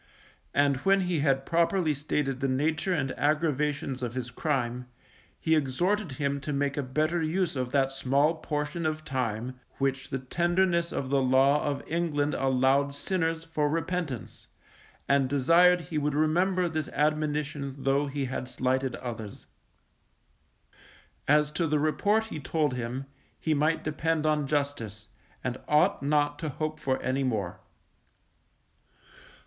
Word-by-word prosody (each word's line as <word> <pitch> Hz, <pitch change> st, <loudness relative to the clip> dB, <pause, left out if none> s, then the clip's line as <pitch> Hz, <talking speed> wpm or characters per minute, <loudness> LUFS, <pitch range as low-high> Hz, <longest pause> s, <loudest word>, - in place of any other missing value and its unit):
And 140 Hz, -1 st, +3 dB
when 195 Hz, +7 st, +3 dB
he 180 Hz, -3 st, 0 dB
had 135 Hz, -2 st, +1 dB
properly 170 Hz, -1 st, +2 dB
stated 140 Hz, -2 st, -2 dB
the 135 Hz, -, 0 dB
nature 155 Hz, +7 st, 0 dB
and 135 Hz, -7 st, 0 dB
aggravations 150 Hz, -3 st, 0 dB
of 120 Hz, -1 st, -3 dB
his 125 Hz, -1 st, -4 dB
crime, 125 Hz, -3 st, -2 dB, 0.5 s
he 160 Hz, -, +1 dB
exhorted 160 Hz, +5 st, +1 dB
him 140 Hz, +1 st, -1 dB
to 150 Hz, -, -4 dB
make 140 Hz, 0 st, 0 dB
a 145 Hz, -, 0 dB
better 155 Hz, +6 st, 0 dB
use 165 Hz, +1 st, 0 dB
of 125 Hz, -2 st, -2 dB
that 135 Hz, 0 st, +2 dB
small 135 Hz, +4 st, +2 dB
portion 150 Hz, +2 st, -2 dB
of 155 Hz, 0 st, -3 dB
time, 125 Hz, -1 st, -3 dB, 0.2 s
which 135 Hz, -1 st, -1 dB
the 135 Hz, -, -1 dB
tenderness 170 Hz, +5 st, +1 dB
of 130 Hz, -1 st, -3 dB
the 140 Hz, -1 st, +3 dB
law 135 Hz, +3 st, +4 dB
of 145 Hz, -1 st, -2 dB
England 155 Hz, -3 st, 0 dB
allowed 135 Hz, +2 st, +2 dB
sinners 165 Hz, 0 st, -1 dB
for 155 Hz, -3 st, -1 dB
repentance, 165 Hz, -5 st, -3 dB, 0.6 s
and 140 Hz, -2 st, +3 dB
desired 170 Hz, +6 st, +5 dB
he 165 Hz, -2 st, -3 dB
would 145 Hz, 0 st, -1 dB
remember 175 Hz, +4 st, +2 dB
this 160 Hz, -2 st, -3 dB
admonition 150 Hz, -2 st, -1 dB
though 135 Hz, +1 st, +1 dB
he 140 Hz, 0 st, -2 dB
had 130 Hz, 0 st, -4 dB
slighted 130 Hz, +1 st, 0 dB
others. 110 Hz, -4 st, -7 dB, 1.8 s
As 150 Hz, +1 st, +4 dB
to 165 Hz, +2 st, 0 dB
the 150 Hz, 0 st, +2 dB
report 200 Hz, +9 st, +2 dB
he 220 Hz, -8 st, -6 dB
told 150 Hz, 0 st, 0 dB
him, 125 Hz, +2 st, -4 dB, 0.3 s
he 160 Hz, -, 0 dB
might 155 Hz, +2 st, +1 dB
depend 155 Hz, +1 st, -1 dB
on 150 Hz, -2 st, +1 dB
Justice, 115 Hz, -8 st, -2 dB, 0.3 s
and 130 Hz, 0 st, -3 dB
ought 155 Hz, +6 st, +3 dB
not 145 Hz, 0 st, +1 dB
to 155 Hz, -, -3 dB
hope 155 Hz, +2 st, -3 dB
for 130 Hz, -3 st, 0 dB
any 130 Hz, +2 st, 0 dB
more. 110 Hz, -8 st, -2 dB
145 Hz, 145 wpm, -28 LUFS, 135-160 Hz, 1.8 s, desired